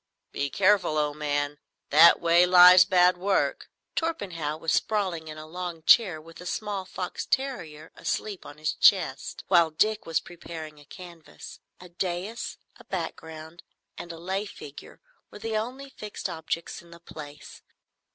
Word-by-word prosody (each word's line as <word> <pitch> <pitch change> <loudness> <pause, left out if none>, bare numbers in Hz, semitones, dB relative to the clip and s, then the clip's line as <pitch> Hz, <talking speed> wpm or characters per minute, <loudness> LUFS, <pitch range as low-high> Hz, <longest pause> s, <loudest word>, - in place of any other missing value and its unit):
"Be 140 - -2
careful, 190 -3 +2
old 150 0 -1
man. 145 -1 -2 0.3
That 160 +3 +8
way 170 +1 +4
lies 180 0 +9
bad 180 -2 +4
work." 195 +1 0 0.3
Torpenhow 180 - -3
was 160 0 -1
sprawling 185 -7 -1
in 155 0 -8
a 155 - -9
long 170 0 -6
chair 185 -4 +5
with 165 +2 -14
a 180 - -8
small 205 -1 -3
fox 180 0 -5
terrier 180 - -3
asleep 205 -4 -4
on 145 - -12
his 155 0 -2
chest, 175 -9 +2
while 170 -3 +4
Dick 215 +7 0
was 165 -1 +1
preparing 160 -3 -10
a 145 - -17
canvas. 170 0 -12 0.2
A 180 - -12
dais, 185 +6 -4 0.2
a - - -16
background, 160 +1 -7 0.3
and 175 - -8
a 165 - -9
lay 190 +5 -3
figure 145 -6 -12 0.3
were - - -11
the 220 +1 -4
only 255 +5 -4
fixed 210 -5 -6
objects 160 +1 -5
in 170 - -19
the 170 0 -14
place. 150 -3 -11
175 Hz, 155 wpm, -26 LUFS, 155-195 Hz, 0.3 s, lies